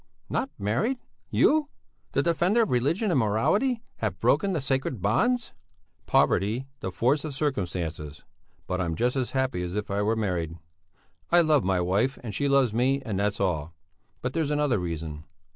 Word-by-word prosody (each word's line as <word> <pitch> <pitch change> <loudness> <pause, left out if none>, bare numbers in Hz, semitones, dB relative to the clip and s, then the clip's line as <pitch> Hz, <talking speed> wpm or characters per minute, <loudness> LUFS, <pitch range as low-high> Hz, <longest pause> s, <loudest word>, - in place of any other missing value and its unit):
"Not - - 0
married! 120 - 0 0.3
You! 305 -1 +3 0.4
The - - +2
defender 175 +7 +3
of 220 - -2
religion 160 - +1
and 140 - +3
morality, 205 - +1
have - - -3
broken 200 -2 +2
the 170 - 0
sacred 135 -3 -1
bonds!" 235 - +1 0.5
"Poverty, 110 +7 +2
the 95 - -4
force 125 - +1
of 150 -3 -5
circumstances! 85 - -3 0.4
But 90 0 -2
I'm 85 -2 -1
just 125 - +1
as 130 -2 -2
happy 130 -7 0
as 90 +1 -4
if 105 -1 -3
I 100 +1 0
were 110 +2 +1
married! 90 -6 -2 0.7
I 175 0 +7
love 155 -5 +3
my 95 0 +1
wife 100 +9 +1
and 110 -4 -5
she 145 - 0
loves 135 -5 +3
me, 135 +4 +1
and 100 -4 -2
that's 105 0 0
all. 80 -4 -1 0.5
But 125 - -2
there's 160 -3 0
another 145 -6 +1
reason. 80 -3 -5
120 Hz, 170 wpm, -27 LUFS, 95-150 Hz, 0.7 s, I